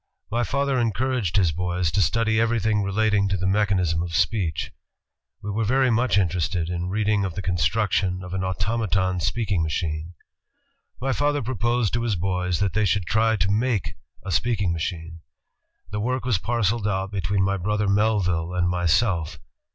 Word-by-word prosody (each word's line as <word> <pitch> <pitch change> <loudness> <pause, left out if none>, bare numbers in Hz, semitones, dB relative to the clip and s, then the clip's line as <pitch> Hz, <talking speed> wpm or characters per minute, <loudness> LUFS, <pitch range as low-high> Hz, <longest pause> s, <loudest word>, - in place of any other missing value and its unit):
My 120 +2 +1
father 140 +4 0
encouraged 115 -3 0
his 90 -5 +3
boys 90 0 -1
to 100 - +1
study 110 +5 +2
everything 110 -2 +1
relating 100 0 +1
to 100 - 0
the 95 - -2
mechanism 95 -4 +1
of 85 -1 -4
speech. 85 -2 0 0.7
We 105 - -3
were 110 +3 -1
very 130 +3 +2
much 120 0 +2
interested 90 -2 0
in 90 0 -3
reading 105 0 +1
of 95 -4 -3
the 95 - -4
construc 90 +4 0
tion 95 -1 0
of 90 0 -7
an 95 -1 -2
automaton 95 -1 0
speaking 100 -1 0
machine.... 80 +1 -3 0.8
"My 135 +2 -1
father 145 -1 0
proposed 120 -1 0
to 120 - +1
his 115 -3 0
boys 90 -1 -1
that 100 -4 +1
they 110 +3 +2
should 95 0 +1
try 110 +4 +2
to 100 -1 0
make 110 -1 0 0.3
a 95 - -4
speaking 100 -2 +1
machine.... 85 0 -4 0.7
The 105 - -2
work 125 +4 -1
was 115 -7 +1
parceled 115 -2 0
out 95 -1 -1
between 95 0 0
my 100 0 +1
brother 105 +3 -1
Melville 95 -5 +1
and 90 -1 +1
myself. 90 -1 +1
100 Hz, 170 wpm, -24 LUFS, 90-110 Hz, 0.8 s, his